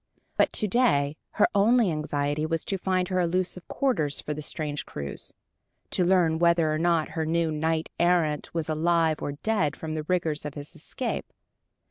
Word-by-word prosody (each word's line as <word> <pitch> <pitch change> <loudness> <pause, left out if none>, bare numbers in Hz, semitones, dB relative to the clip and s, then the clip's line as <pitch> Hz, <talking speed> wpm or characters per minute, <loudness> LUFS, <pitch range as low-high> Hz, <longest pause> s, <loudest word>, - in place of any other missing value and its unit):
But - - +3
to 215 - +1
day 155 - +2 0.2
her 210 - +4
only 220 0 +4
anxiety 150 -1 -1
was 165 -1 -2
to 195 - -2
find 185 -1 0
her 185 -1 +1
elusive 180 +1 -1
quarters 160 - 0
for 150 - -4
the 150 - -6
strange 150 -1 -3
cruise, 70 -1 -7 0.6
to 180 - +2
learn 175 -3 +3
whether 170 -2 +3
or 155 - -1
not 165 -2 +2
her 160 - -2
new 165 0 +1
knight 160 +1 -1
errant 170 -4 +2
were 165 -1 -1
alive 160 0 +1
or 145 - -3
dead 155 -2 0
from 160 -1 -5
the 155 - -2
rigors 160 -2 -1
of 150 -1 -6
his 145 0 -8
escape. - - -4
165 Hz, 175 wpm, -27 LUFS, 150-180 Hz, 0.6 s, her